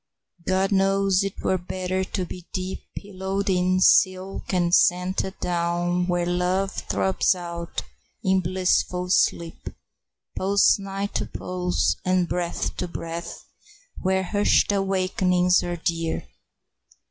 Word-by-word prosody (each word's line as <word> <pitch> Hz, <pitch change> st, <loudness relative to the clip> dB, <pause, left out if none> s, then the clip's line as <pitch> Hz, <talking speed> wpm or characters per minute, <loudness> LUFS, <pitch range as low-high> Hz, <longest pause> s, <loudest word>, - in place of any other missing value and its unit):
God 190 Hz, +1 st, +1 dB
knows 195 Hz, 0 st, +3 dB, 0.2 s
'twere 185 Hz, -, 0 dB
better 185 Hz, +1 st, -2 dB
to 185 Hz, 0 st, -3 dB
be 180 Hz, 0 st, -10 dB
deep 185 Hz, -1 st, -3 dB, 0.2 s
Pillowed 195 Hz, 0 st, -3 dB
in 185 Hz, 0 st, +2 dB
silk 185 Hz, +1 st, +3 dB
and 175 Hz, -2 st, +1 dB
scented 185 Hz, +2 st, +2 dB
down, 175 Hz, +1 st, 0 dB
Where 175 Hz, -1 st, 0 dB
love 180 Hz, +2 st, 0 dB
throbs 190 Hz, 0 st, +1 dB
out 170 Hz, -1 st, -5 dB, 0.4 s
in 190 Hz, 0 st, +3 dB
blissful 180 Hz, 0 st, 0 dB
sleep, 170 Hz, -3 st, +1 dB, 0.7 s
Pulse 200 Hz, +2 st, +3 dB
nigh 195 Hz, 0 st, -4 dB
to -, -, -1 dB
pulse, 180 Hz, -1 st, -1 dB
and 185 Hz, -1 st, +2 dB
breath 175 Hz, -1 st, -2 dB
to 180 Hz, -, -2 dB
breath, 170 Hz, 0 st, -6 dB, 0.6 s
Where 190 Hz, 0 st, +1 dB
hushed 205 Hz, +2 st, +2 dB
awakenings 185 Hz, -2 st, +2 dB
are 175 Hz, 0 st, -3 dB
dear. 165 Hz, 0 st, -2 dB
185 Hz, 115 wpm, -24 LUFS, 175-190 Hz, 0.7 s, knows